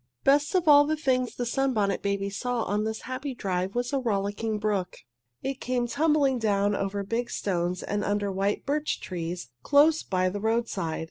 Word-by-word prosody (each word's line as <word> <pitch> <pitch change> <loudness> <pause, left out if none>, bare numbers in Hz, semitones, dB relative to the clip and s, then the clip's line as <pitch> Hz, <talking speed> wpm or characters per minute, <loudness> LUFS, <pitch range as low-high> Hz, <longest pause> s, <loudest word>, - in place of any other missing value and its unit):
Best 290 +6 +3
of 360 -3 +2
all 290 -1 +8
the 310 - +1
things 255 -4 0
the 245 - -2
Sunbonnet 235 -6 0
Babies 200 0 -2
saw 245 -2 -1
on 210 +1 -1
this 220 0 -3
happy 260 +2 -5
drive 185 -1 -2
was 245 +3 -1
a 275 - +2
rollicking 210 -1 -1
brook. 205 -4 -1 0.5
It 270 0 -3
came 250 -1 0
tumbling 285 -1 +2
down 205 -2 +1
over 200 0 -2
big 230 +4 -2
stones 180 -2 -2
and 205 0 -2
under 205 0 0
white 195 +2 -1
birch 295 +2 -1
trees 175 -4 -5
close 300 +2 +4
by 185 -1 0
the 205 +2 -4
roadside. 220 -7 -1
220 Hz, 180 wpm, -27 LUFS, 200-265 Hz, 0.5 s, all